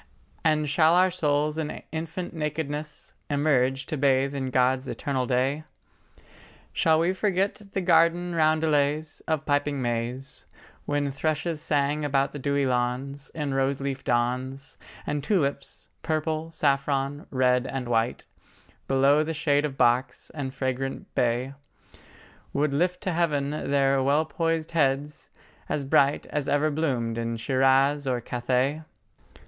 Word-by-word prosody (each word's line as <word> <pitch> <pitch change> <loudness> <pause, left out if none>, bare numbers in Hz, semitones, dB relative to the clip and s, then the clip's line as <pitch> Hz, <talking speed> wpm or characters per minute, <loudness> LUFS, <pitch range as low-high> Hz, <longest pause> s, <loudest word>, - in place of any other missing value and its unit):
And 155 -1 +2
shall 160 +3 +4
our 185 +1 +4
souls 150 -2 0
in 155 -1 -4
infant 165 +3 -5
nakedness 150 -1 -4 0.2
Emerge 135 -2 +1
to 155 - -4
bathe 135 0 +2
in 135 -2 -3
God's 130 +1 +2
eternal 130 -3 -2
day? 135 +4 0 1.1
Shall 160 -1 +3
we 170 +3 +2
forget 195 +1 0
the 195 - 0
garden 175 0 +3
roundelays 155 -1 +1
Of 155 -1 -1
piping 145 -1 0
Mays, 125 +2 -3 0.4
When 145 -1 0
thrushes 155 +2 -2
sang 145 0 0
around 140 -1 +1
the 145 - -7
dewy 140 +1 0
lawns 130 +3 -2
In 145 -3 -2
roseleaf 135 0 -1
dawns, 130 +3 -2 0.3
And 145 -1 -2
tulips—purple, 155 -1 -2
saffron, 140 -1 0
red 125 -1 +2
and 130 -2 -4
white,— 115 0 0 0.6
Below 135 +2 +4
the 160 +1 -3
shade 145 -1 +2
of 135 -2 -5
box 120 +1 +1
and 140 -4 -4
fragrant 130 0 -3
bay, 125 +2 0 1.0
Would 145 0 +1
lift 180 +5 0
to 190 - -1
heaven 150 -5 0 0.2
their 135 -1 +3
well 145 +4 +2
poised 165 +1 -1
heads, 145 -2 0 0.4
as 140 - -1
bright 140 +1 +3
As 145 -2 -1
ever 150 +2 +2
bloomed 125 -7 -1
in 115 0 -2
Shiraz 135 +4 +2
or 125 -2 0
Cathay? 125 +5 -1
140 Hz, 130 wpm, -26 LUFS, 135-155 Hz, 1.1 s, shall